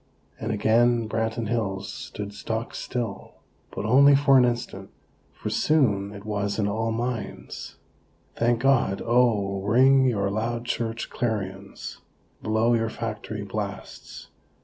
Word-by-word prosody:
and 110 - -3
again, 115 +2 +3
Branton 110 0 -2
Hills 100 -4 -2
stood 105 0 -7
stock 110 +3 -4
still. 120 -5 -5 0.3
But - - -5
only 140 +5 +6
for 135 0 +4
an 125 -2 +7
instant; 120 0 -3 0.4
for - - -6
soon, 105 -11 +2
it 100 0 -10
was, 100 -1 -2
in 105 -2 +1
all 110 +2 -1
minds: 120 0 -4 0.6
"Thank 115 0 +1
God!! 130 -7 +2
Oh, 110 -5 +2
ring 130 +6 +5
your 100 -6 +1
loud 115 +3 -2
church 115 -1 -3
clarions! 100 -4 -4 0.4
Blow 110 +2 +2
your 115 -1 +1
factory 110 -2 -5
blasts! 100 0 -7
115 Hz, 125 wpm, -25 LUFS, 105-120 Hz, 0.6 s, an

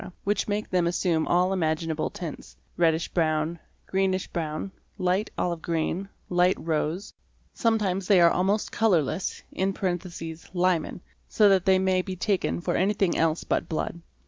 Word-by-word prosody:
which 205 0 0
make 210 +1 -1
them 180 -2 +2
assume 170 -2 +1
all 180 +2 +3
imaginable 160 -2 -1
tints; 165 -5 -8 0.2
reddish 165 -1 +2
brown, 160 0 0 0.3
greenish 190 -1 0
brown, 160 +3 -3 0.3
light 185 +2 0
olive 170 -2 -1
green, 170 +4 -2 0.2
light 180 +1 +3
rose: 165 +4 -2 0.4
some 230 -2 +2
times 190 -3 -1
they 195 -3 +6
are 170 -1 +6
almost 195 +4 +1
colourless 180 -6 +1
(Liman), 180 -2 -2 0.3
so 210 - +5
that 190 -2 +3
they 190 -1 +5
may 185 -1 +2
be 185 0 -5
taken 180 - 0
for - - -1
anything 195 -1 +1
else 165 0 +1
but - - -1
blood. 170 +1 -3
180 Hz, 145 wpm, -26 LUFS, 165-190 Hz, 0.4 s, they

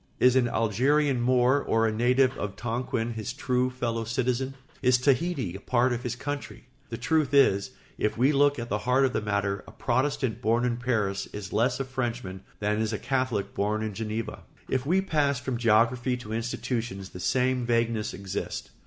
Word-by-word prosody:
Is 125 0 +5
an 130 -2 +4
Algerian 130 +5 +2
Moor 125 +2 +3
or 115 0 +2
a 110 - +2
native 125 +4 +3
of 105 -6 -4
Tonquin 120 -1 -2
his 110 +2 -4
true 130 -2 0
fellow 120 -3 -2
citizen? 130 +3 -1 0.3
Is 125 -2 +4
Tahiti 135 - +1
a - - -6
part 125 +4 +2
of 120 - -3
his 120 -1 -3
"country"? 145 +3 -5 0.3
The 115 - -4
truth 155 -2 +1
is, 100 -8 +4 0.3
if 105 - 0
we 130 +5 +4
look 145 0 +3
at 120 -1 -5
the 105 - 0
heart 130 +3 +3
of 130 - -1
the - - 0
matter, 100 -1 -1
a - - -10
Protestant 130 -1 -1
born 115 +3 +2
in 120 -1 0
Paris 105 -6 -1
is 100 -3 -6
less 125 +3 +2
a 135 - -1
Frenchman 120 -7 -4 0.2
than 105 +1 0
is 110 0 0
a - - 0
Catholic 130 -2 -1
born 105 +2 0
in 110 -1 -3
Geneva. 110 +2 -4 0.3
If 130 +1 -1
we 185 +4 +3
pass 145 -7 +1
from 130 -1 -3
geography 120 +2 +2
to 110 -3 -7
institutions 115 -3 -3
the 90 - -10
same 125 +4 +1
vagueness 115 -2 0
exists. 95 0 -5
120 Hz, 190 wpm, -27 LUFS, 110-130 Hz, 0.3 s, Is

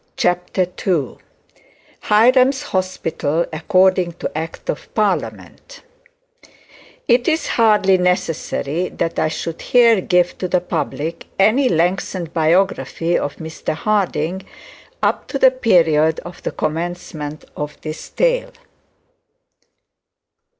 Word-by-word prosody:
CHAPTER 180 +1 +1 0.2
II 155 -9 0 0.8
HIRAM'S 255 +5 +4
HOSPITAL 170 -4 -1
ACCORDING 185 +1 +2
TO 165 - -6
ACT 160 +1 -5
OF - - -10
PARLIAMENT - - -3 1.2
It 240 0 +3
is 320 0 +1
hardly 210 -5 +3
necessary 180 -2 -1
that 165 0 -3
I - - +2
should 165 +1 -5
here 235 -5 +4
give 180 -1 +1
to 185 - -2
the 180 0 +2
public 165 -2 -4
any 240 +7 +4
lengthened 175 0 -1
biography 170 0 +1
of 145 - -1
Mr 160 -1 -5
Harding, 185 -2 -1 0.6
up - - 0
to 275 - -3
the 260 -1 +6
period 165 -10 +3
of 175 0 -11
the - - -2
commencement 155 -2 -4
of 150 0 -6
this 155 0 -7
tale. - - 0
180 Hz, 110 wpm, -19 LUFS, 160-210 Hz, 1.2 s, the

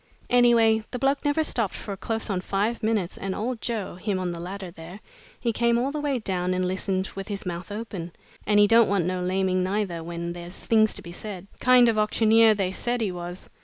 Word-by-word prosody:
Anyway, 230 -3 +5
the - - -4
bloke 275 +2 +1
never 290 +2 +2
stopped 230 -9 0
for 200 - -5
close 225 +3 -2
on 190 -3 -1
five 205 +5 -1
minutes, 215 -5 -1
and 195 -1 -3
old 235 +2 -3
Joe 225 -5 -3
him 190 +2 -2
on 180 -1 -2
the 170 - -6
ladder 185 +1 -6
there 170 +3 -10 0.4
he 235 -2 -1
came 235 +1 +2
all 260 +4 0
the 300 0 -3
way 285 -3 0
down 185 -4 -1
and 185 0 0
listened 190 +1 -1
with 195 0 -6
his 200 -2 -5
mouth 175 +1 -5
open, 205 -5 -6 0.4
and 205 0 +4
he 205 - +7
don't 230 +2 +5
want 195 -4 +1
no 180 0 -1
laming 185 0 +1
neither 185 -3 -2
when 170 0 -5
there's 175 +1 -7
things 220 -1 +2
to - - -4
be 170 - -9
said. 190 0 -7
Kind 250 -1 +6
of 225 -2 +2
auctioneer 220 +1 +4
they 190 -2 -1
said 240 +5 -2
he 215 -5 -1
was. 175 +1 -7
200 Hz, 220 wpm, -25 LUFS, 185-230 Hz, 0.4 s, he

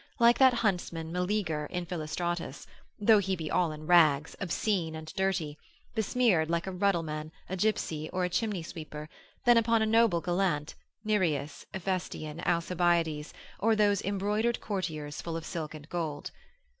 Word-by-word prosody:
like 235 0 +5
that 260 -2 +7
huntsman 175 -7 -1
Meleager 180 -4 -1
in 180 -1 -4
Philostratus, 170 -2 -3 0.3
though 215 +1 +6
he 190 -1 0
be 160 -3 -5
all 175 -3 +2
in 155 0 -8
rags, 155 -4 +4
obscene 180 -3 -1
and 160 0 -8
dirty, 185 -6 -1 0.3
besmeared 220 -7 +2
like 170 0 0
a 190 - -3
ruddleman, 165 -5 -1 0.2
a 190 - -3
gipsy, 170 -6 -1
or 185 0 -1
a - - -1
chimney 195 -1 -1
sweeper, 155 -2 -7 0.4
than 240 -1 +7
upon 230 -1 +3
a - - +2
noble 225 -5 +4
gallant, 175 -4 0 0.3
Nireus, 170 -9 0
Ephestion, 180 -4 -3
Alcibiades, 170 -3 +1 0.3
or 225 +2 +3
those 205 -2 +3
embroidered 210 +4 0
courtiers 155 -8 -4
full 165 -1 -4
of 165 - -7
silk 155 -2 -5
and 150 -1 -11
gold. 160 -4 -3
175 Hz, 150 wpm, -30 LUFS, 160-200 Hz, 0.4 s, that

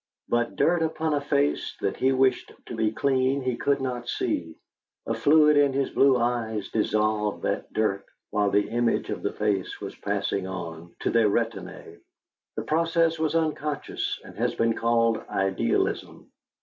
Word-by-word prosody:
But 120 0 0
dirt 175 0 +2
upon 160 -1 0
a 145 - +1
face 145 0 0
that 100 - -1
he 130 - +2
wished 130 0 +2
to 120 - -7
be 110 -1 +1
clean 130 +2 +1
he 125 -1 0
could 140 +3 +1
not 125 -2 -4
see 80 -1 -2 0.5
a 115 - -1
fluid 150 +5 +5
in 140 -2 +4
his 135 0 0
blue 135 -2 +4
eyes 115 -3 -1
dissolved 105 -1 0
that - - -2
dirt 100 -3 0 0.3
while 105 -1 +2
the 105 +1 +2
image 120 0 0
of - - -4
the - - -1
face 100 -3 -1
was - - -7
passing 95 -1 -2
on 85 -2 -7
to - - 0
their 115 -2 +4
retinae. 115 +2 -3 0.6
The 110 - -3
process 165 +3 +1
was 160 0 0
unconscious, 155 -2 -2
and - - -12
has - - 0
been 115 0 +2
called 115 -1 +2
idealism. 95 0 -1
120 Hz, 160 wpm, -26 LUFS, 105-140 Hz, 0.6 s, fluid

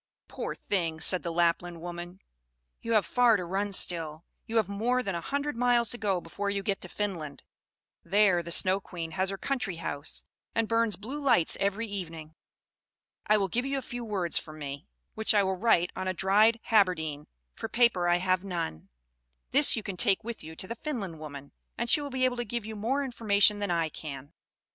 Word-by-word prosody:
"Poor - - -5
thing," 165 -5 -2
said 185 +2 +5
the 170 - -4
Lapland 170 0 0
woman, 175 +2 -7 0.6
"you 230 - -2
have 210 -5 +4
far 245 +1 +4
to 180 - -4
run 195 +3 -2
still. 165 -4 +1 0.2
You 225 - -5
have 220 - +3
more 235 +6 0
than 195 - -2
a 170 - -3
hundred 285 - -2
miles 240 -1 +2
to 240 - -3
go 195 -4 0
before 200 +4 -4
you 200 -1 -2
get 195 0 -1
to 185 - -6
Finland; 170 -9 -4 0.6
there 190 -1 +3
the 170 - -9
Snow 185 +3 +4
Queen 170 -4 -7
has 190 +4 0
her 195 - -3
country 245 -7 -2
house, 145 -3 -5 0.3
and 225 -1 +1
burns 230 -1 +2
blue 260 +9 -6
lights 255 - +3
every 200 +3 0
evening. 165 -7 -7 0.9
I 215 - +5
will 195 -2 +1
give 240 +7 -1
you 275 +1 -2
a 265 - -4
few 240 0 -6
words 195 -6 0
from 155 -1 -11
me, 140 +1 -7 0.3
which 220 0 +4
I 205 - +5
will 190 0 0
write 180 -4 +3
on 185 0 -4
a 185 - -1
dried 210 +5 +4
haberdine, 160 -8 +2 0.3
for - - -6
paper 225 -8 +3
I 175 - +4
have 185 +1 +1
none; 170 - -4 0.6
this 285 +2 +6
you 220 - -4
can 195 -2 -5
take 200 +1 +3
with 235 0 -6
you 160 +1 -9
to 185 - -6
the 230 - -4
Finland 230 - -5
woman, 140 -2 -9 0.3
and 235 - -2
she 295 - +5
will 285 - -5
be 260 -1 0
able 250 -1 0
to 240 - -1
give 235 0 -4
you 220 0 -6
more 250 +7 -1
information 210 -5 +3
than 205 -1 -2
I 165 -2 +1
can." 145 -1 -8
195 Hz, 205 wpm, -29 LUFS, 170-230 Hz, 0.9 s, this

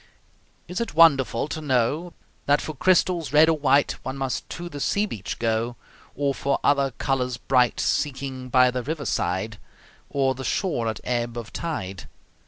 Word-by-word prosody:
Is 180 +5 -3
it 235 - -4
wonderful 140 -7 +4
to 155 - -4
know 145 +5 0 0.3
That 145 +1 +4
for 155 - -5
crystals 175 0 +2
red 155 +2 +6
or 160 - +2
white 140 0 +3
One 130 +1 -4
must 135 -2 -3
to 175 +1 -6
the 145 -4 -7
sea 200 +8 +1
beach 105 - -6
go, 115 +1 -1 0.4
Or 140 -1 0
for 140 +1 -1
other 140 -1 +3
colors 125 -3 -1
bright, 125 -2 +2
Seeking 130 -3 -2
by 125 0 +5
the 125 0 -2
river's 140 0 -3
side 95 +4 -2 0.5
Or 135 -1 +1
the 130 +1 -7
shore 130 - -1
at 110 -2 -3
ebb 120 -1 -2
of 115 -1 -7
tide? 100 - -4
135 Hz, 170 wpm, -24 LUFS, 120-150 Hz, 0.5 s, red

